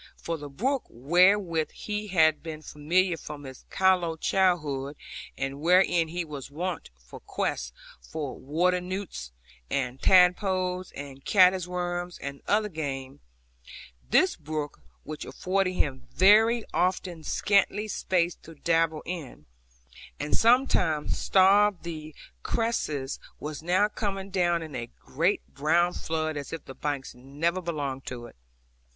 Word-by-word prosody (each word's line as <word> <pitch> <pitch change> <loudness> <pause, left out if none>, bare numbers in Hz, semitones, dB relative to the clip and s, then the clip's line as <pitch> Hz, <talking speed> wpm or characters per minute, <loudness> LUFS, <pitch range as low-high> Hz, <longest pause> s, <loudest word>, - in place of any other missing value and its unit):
For 165 - -3
the 145 -2 -8
brook, 255 - -1
wherewith 170 - +3
he 210 0 -4
had 160 -5 +3
been 155 -1 -7
familiar 170 +5 +1
from 150 -2 -8
his 130 -1 -11
callow 180 -4 +2
childhood, 150 -7 +1 0.4
and 135 +1 -3
wherein 175 0 +4
he 170 +1 -3
was 145 -4 -7
wont 170 +4 -4 0.2
to - - -8
quest 60 0 -3 0.3
for 135 - -5
water 175 +6 +1
newts, 180 - -5 0.4
and 130 -1 -2
tadpoles, 185 0 +3
and 140 -1 -9
caddis 185 -2 +5
worms, 175 0 -3
and 140 0 -7
other 210 +1 +2
game, 140 -6 -5 0.9
this 185 - +4
brook, 155 - -5 0.2
which 155 0 -6
afforded 185 0 -1
him 135 -7 -2
very 220 +4 +5
often 180 -2 0
scanty 205 +4 +2
space 180 -4 0
to 165 - -14
dabble 165 0 +1
in, 155 - -7 0.7
and 150 - -1
sometimes 225 - +3
starved 200 0 +4
the 155 -3 -7 0.3
cresses, 150 - -1 0.2
was 150 0 -6
now 180 +5 +3
coming 195 -2 -4
down 175 -3 +1
in 155 -2 -9
a 120 -1 -4
great 170 +8 0
brown 170 +5 +2
flood, 155 -2 -2
as 140 - -6
if 165 -2 -6
the 135 - -9
banks 140 -1 -4
never 145 +8 -2
belonged 145 -6 -3
to 120 -2 -6
it. 120 - -13
170 Hz, 135 wpm, -27 LUFS, 145-185 Hz, 0.9 s, caddis